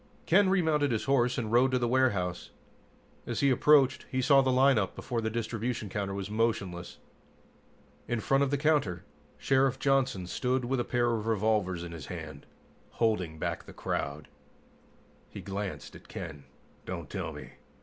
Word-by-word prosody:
Ken 190 Hz, +3 st, +4 dB
remounted 160 Hz, -7 st, +2 dB
his 110 Hz, -, 0 dB
horse 125 Hz, -2 st, +2 dB
and 110 Hz, -4 st, -2 dB
rode 125 Hz, +3 st, +5 dB
to 130 Hz, -, +1 dB
the 120 Hz, -1 st, 0 dB
warehouse. 90 Hz, -, 0 dB, 0.8 s
As -, -, -2 dB
he 140 Hz, -1 st, +4 dB
approached, 135 Hz, 0 st, +4 dB
he 130 Hz, -, -1 dB
saw 135 Hz, +1 st, +5 dB
the 130 Hz, -, +1 dB
lineup 125 Hz, -6 st, +3 dB
before 120 Hz, -3 st, -3 dB
the 110 Hz, -, -1 dB
distribution 115 Hz, 0 st, -3 dB
counter 100 Hz, 0 st, -3 dB
was 100 Hz, -1 st, -4 dB
motionless. 105 Hz, -5 st, -2 dB, 1.1 s
In 120 Hz, -, -1 dB
front 135 Hz, +5 st, +2 dB
of 140 Hz, -, 0 dB
the 145 Hz, -, 0 dB
counter, 140 Hz, -, +1 dB, 0.3 s
Sheriff 135 Hz, -1 st, +2 dB
Johnson 135 Hz, -9 st, +1 dB
stood 125 Hz, +6 st, -1 dB
with 130 Hz, +1 st, 0 dB
a -, -, +1 dB
pair 120 Hz, 0 st, +1 dB
of 110 Hz, -1 st, -2 dB
revolvers 105 Hz, -5 st, +1 dB
in 85 Hz, -, -7 dB
his 80 Hz, -5 st, -8 dB
hands, -, -, -8 dB, 0.5 s
holding 95 Hz, -9 st, 0 dB
back -, -, -3 dB
the -, -, -12 dB
crowd. 70 Hz, +2 st, -3 dB, 1.0 s
He -, -, -9 dB
glanced 100 Hz, 0 st, -5 dB
at -, -, -14 dB
Ken -, -, -6 dB
and 70 Hz, -1 st, -12 dB
said, 65 Hz, -, -31 dB
"Don't -, -, -5 dB
tell -, -, -3 dB
me! -, -, -10 dB
120 Hz, 170 wpm, -29 LUFS, 100-135 Hz, 1.1 s, rode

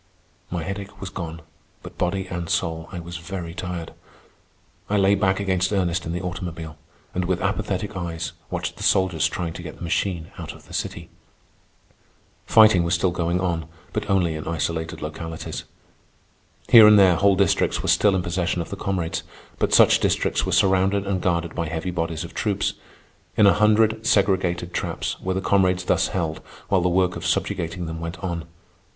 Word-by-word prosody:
My 85 Hz, -2 st, -3 dB
headache 100 Hz, +2 st, -6 dB
was 95 Hz, -2 st, -6 dB
gone, 80 Hz, -4 st, -6 dB, 0.4 s
but, -, -, -11 dB
body 95 Hz, +2 st, 0 dB
and 85 Hz, -2 st, -5 dB
soul, 80 Hz, 0 st, -1 dB
I 90 Hz, -, -5 dB
was 85 Hz, +1 st, -7 dB
very 85 Hz, 0 st, -6 dB
tired. 90 Hz, -2 st, -5 dB, 1.0 s
I 105 Hz, -, +2 dB
lay 100 Hz, 0 st, +4 dB
back 95 Hz, -1 st, +2 dB
against 95 Hz, -1 st, 0 dB
Ernest 90 Hz, -4 st, 0 dB
in -, -, -3 dB
the 90 Hz, +2 st, -3 dB
automobile, 85 Hz, -3 st, -5 dB, 0.4 s
and 90 Hz, 0 st, -1 dB
with 90 Hz, 0 st, 0 dB
apathetic 100 Hz, 0 st, -2 dB
eyes 85 Hz, -3 st, -4 dB, 0.2 s
watched -, -, -4 dB
the -, -, -11 dB
soldiers 95 Hz, -5 st, +3 dB
trying 85 Hz, -2 st, -4 dB
to 90 Hz, -, -8 dB
get 85 Hz, -, -8 dB
the -, -, -10 dB
machine 85 Hz, -1 st, -1 dB
out -, -, -6 dB
of -, -, -16 dB
the -, -, -14 dB
city. -, -, -4 dB, 1.4 s
Fighting 110 Hz, -5 st, +7 dB
was 85 Hz, +1 st, +1 dB
still 90 Hz, +2 st, +1 dB
going 85 Hz, +1 st, 0 dB
on, 85 Hz, -4 st, -1 dB, 0.3 s
but 105 Hz, -1 st, -3 dB
only 90 Hz, -4 st, +2 dB
in 75 Hz, -, -6 dB
isolated 85 Hz, +1 st, -2 dB
localities. 80 Hz, +1 st, -6 dB, 1.0 s
Here 110 Hz, -2 st, +9 dB
and 105 Hz, 0 st, +8 dB
there 95 Hz, -3 st, +7 dB
whole 100 Hz, +2 st, +4 dB
districts 95 Hz, -2 st, +1 dB
were -, -, -2 dB
still 100 Hz, -2 st, +4 dB
in 90 Hz, -, 0 dB
possession 90 Hz, 0 st, -1 dB
of 85 Hz, -, -5 dB
the -, -, -3 dB
comrades, 90 Hz, -4 st, -2 dB, 0.4 s
but -, -, +1 dB
such -, -, +6 dB
districts -, -, +1 dB
were -, -, -1 dB
surrounded 95 Hz, +1 st, +3 dB
and 95 Hz, -2 st, -1 dB
guarded 85 Hz, -2 st, 0 dB
by 85 Hz, -, -2 dB
heavy 80 Hz, +3 st, -3 dB
bodies 85 Hz, -2 st, -2 dB
of 85 Hz, -, -9 dB
troops. 100 Hz, -3 st, 0 dB, 0.6 s
In 105 Hz, -, +6 dB
a 100 Hz, -, +7 dB
hundred 110 Hz, +1 st, +3 dB
segregated 95 Hz, -4 st, +1 dB
traps -, -, -3 dB
were 95 Hz, 0 st, -2 dB
the 95 Hz, -, -1 dB
comrades 95 Hz, -2 st, +2 dB
thus -, -, +2 dB
held 80 Hz, -4 st, -2 dB, 0.3 s
while 95 Hz, -2 st, +3 dB
the 90 Hz, -, +2 dB
work 90 Hz, 0 st, +2 dB
of -, -, -6 dB
subjugating 85 Hz, +1 st, -1 dB
them 80 Hz, 0 st, -5 dB
went 85 Hz, +1 st, -5 dB
on. 85 Hz, -3 st, -3 dB
90 Hz, 180 wpm, -23 LUFS, 85-95 Hz, 1.4 s, Here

